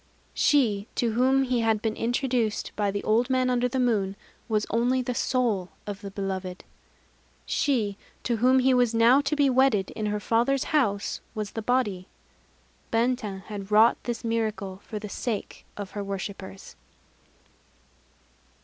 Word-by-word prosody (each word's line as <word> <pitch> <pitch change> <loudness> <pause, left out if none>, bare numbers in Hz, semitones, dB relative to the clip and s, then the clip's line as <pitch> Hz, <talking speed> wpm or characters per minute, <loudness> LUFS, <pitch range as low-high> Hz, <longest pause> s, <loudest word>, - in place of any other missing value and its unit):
_ - - -36 0.3
She 225 -8 +2
to 235 -2 +1
whom 260 +4 +3
he 250 -2 0
had 225 -2 +2
been 220 0 -2
introduced 240 -2 -1
by 205 -1 0
the 200 +1 -3
Old 235 +4 +2
Man 255 -1 +2
under 250 0 +2
the 260 +2 -2
Moon, 210 -6 +1 0.3
was 215 -1 +1
only 245 +3 +2
the 250 - -2
soul 235 -8 0 0.2
of 205 -1 -6
the 200 - -6
beloved. 190 -2 -4 0.8
She 225 -9 0 0.3
to 235 -2 0
whom 255 +4 +4
he 260 +1 +4
was 245 -2 +2
now 235 +5 +6
to 285 +2 -1
be 290 -1 +3
wedded, 255 -7 +3
in 215 -1 -3
her 210 0 -1
father's 240 +6 +1
house, 210 -9 +1
was 210 -2 -4
the 225 - -4
body. 210 -6 0 0.8
Benten 225 -4 0
had 200 -1 -7
wrought 220 +3 +6
this 240 0 -3
miracle 215 -4 -2
for 215 - -5
the 210 0 -6
sake 215 +1 -5
of 200 -2 -6
her 205 - -4
worshippers. 195 -1 -7
225 Hz, 160 wpm, -26 LUFS, 205-250 Hz, 0.8 s, now